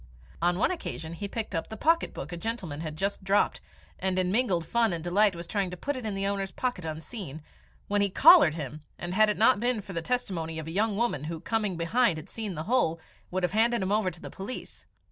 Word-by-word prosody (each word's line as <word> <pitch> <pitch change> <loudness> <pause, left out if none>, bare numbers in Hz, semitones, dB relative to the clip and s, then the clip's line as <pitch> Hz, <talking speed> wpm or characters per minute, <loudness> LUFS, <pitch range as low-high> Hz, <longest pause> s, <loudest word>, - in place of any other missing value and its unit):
On 175 +1 +2
one 210 - +2
occasion 165 - -5
he 200 +4 -4
picked 220 0 -4
up 165 - -2
the 220 - -7
pocket 330 +7 +2
book 145 - -7
a - - -4
gentleman 185 -7 -4
had 155 -2 -5
just 195 +2 -2
dropped, 195 +2 +2 0.4
and, 190 -1 0
in 185 -1 +2
mingled 195 -7 +2
fun 230 -1 +2
and 165 -2 -4
delight, 195 +2 +3
was 170 0 -6
trying 200 -1 -1
to 180 - -7
put 285 +9 -2
it 250 -4 -4
in 200 -2 -3
its 195 - -1
owner's 195 -1 -1
pocket 245 -5 -3
unseen, 160 - -6 0.4
when 205 0 +1
he 200 - +3
collared 155 -3 +7
him, 150 -1 -6 0.2
and, 175 +1 -5
had 215 +2 +5
it 210 - 0
not 225 0 +5
been 240 0 +1
for 195 -1 -8
the 170 - -2
testimony 165 -7 -2
of 160 - -5
a 160 - -6
young 205 +3 +1
woman 215 - 0
who, 165 +1 -4
coming 210 0 -1
behind, 175 +2 +2
had 155 - -9
seen 215 -5 -4
the 155 - -4
whole, 165 -7 +1 0.3
would 185 0 -2
have 180 - +1
handed 230 0 +2
him 190 - -1
over 210 -2 +2
to 175 -1 -12
the - - -8
police. 195 +7 -8
195 Hz, 240 wpm, -28 LUFS, 170-220 Hz, 0.4 s, collared